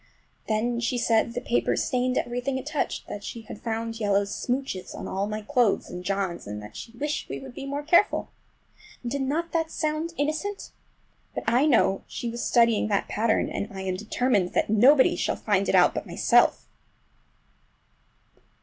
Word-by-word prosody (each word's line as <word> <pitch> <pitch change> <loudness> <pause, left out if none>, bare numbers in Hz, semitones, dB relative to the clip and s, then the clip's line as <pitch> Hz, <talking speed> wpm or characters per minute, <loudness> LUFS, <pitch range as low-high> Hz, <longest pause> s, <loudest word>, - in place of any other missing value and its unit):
Then 235 +2 0
she 245 +1 0
said 230 -2 +3
that 235 - -9
the 245 - -5
paper 240 - +2
stained 250 0 0
everything 245 +2 -1
it 260 - -6
touched, 300 -1 -2
that 205 - -6
she 230 - -6
had 215 -1 -10
found 225 0 -3
yellow 205 -2 +2
smooches 245 -2 -3
on - - -6
all 195 +2 -2
my 215 0 -4
clothes 240 -3 +1
and 180 0 -6
John's, 195 - -2
and 105 0 -6
she - - -8
wished 295 +5 -3
we - - -4
would 265 -2 -10
be 270 - -7
more 285 +1 -3
careful! 345 +6 +3 0.7
Did 275 +4 -2
not 315 +6 -1
that 325 -1 0
sound 315 +1 -2
innocent? 310 +8 -2 0.6
But - - -3
I 245 +6 +3
know 225 -8 +3
she 240 - -5
was 235 +1 -4
studying 230 -3 +3
that 200 -2 0
pattern, 220 +1 +1
and 200 - -3
I 190 -1 -6
am 190 -1 -2
determined 215 -1 0
that - - +1
nobody 260 +6 +6
shall - - -1
find 200 -2 0
it - - +3
out - - +6
but - - -4
myself! - - +3
235 Hz, 175 wpm, -26 LUFS, 205-275 Hz, 0.7 s, nobody